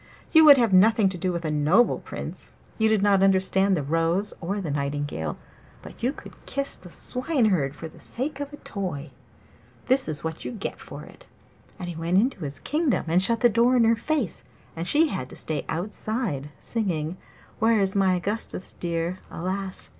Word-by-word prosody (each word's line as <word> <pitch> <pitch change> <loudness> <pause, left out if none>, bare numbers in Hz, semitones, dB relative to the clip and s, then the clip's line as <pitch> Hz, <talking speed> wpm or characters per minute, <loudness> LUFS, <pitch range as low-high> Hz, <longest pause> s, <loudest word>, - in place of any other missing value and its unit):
'You 320 -1 +7
would 290 -2 +10
have 230 -6 +2
nothing 210 +2 +5
to 185 - -6
do 185 0 0
with 170 -1 -4
a 155 - 0
noble 155 +11 +3
Prince; - - -8 0.3
you 220 0 +4
did 215 -2 +2
not 200 -2 +4
understand 190 0 +3
the 150 - -2
rose 165 +7 0
or 195 +4 -2
the 170 -7 -3
nightingale, 140 - -3 0.5
but - - -12
you 245 +3 +1
could - - -13
kiss 275 0 -3
the 180 - -14
Swineherd 215 - 0
for 165 - -7
the 160 - -16
sake 270 +3 -4
of 285 0 -5
a 290 - -9
toy. 175 - -5 0.7
This 260 +1 +3
is 150 -1 -1
what 160 0 -4
you - - -5
get 210 - -5
for - - -9
it!' - - -15 0.5
And 180 - -6
he 175 - -5
went 165 +3 0
into 240 +2 +2
his 140 -1 -5
kingdom 300 -2 0
and 175 +3 +4
shut 230 +4 +1
the 240 - +7
door 235 +3 +3
in 235 - +5
her 230 +1 +4
face, 260 - -2 0.3
and 165 +1 -3
she 310 +6 +4
had 130 - -4
to - - -10
stay 155 -2 -2
outside 185 - -2
singing 180 -7 -2 0.4
'Where's 215 -4 +3
my 190 -2 +3
Augustus 195 +1 -2
dear? 170 +1 -2
Alas! 190 +2 -4
190 Hz, 190 wpm, -25 LUFS, 165-230 Hz, 0.7 s, would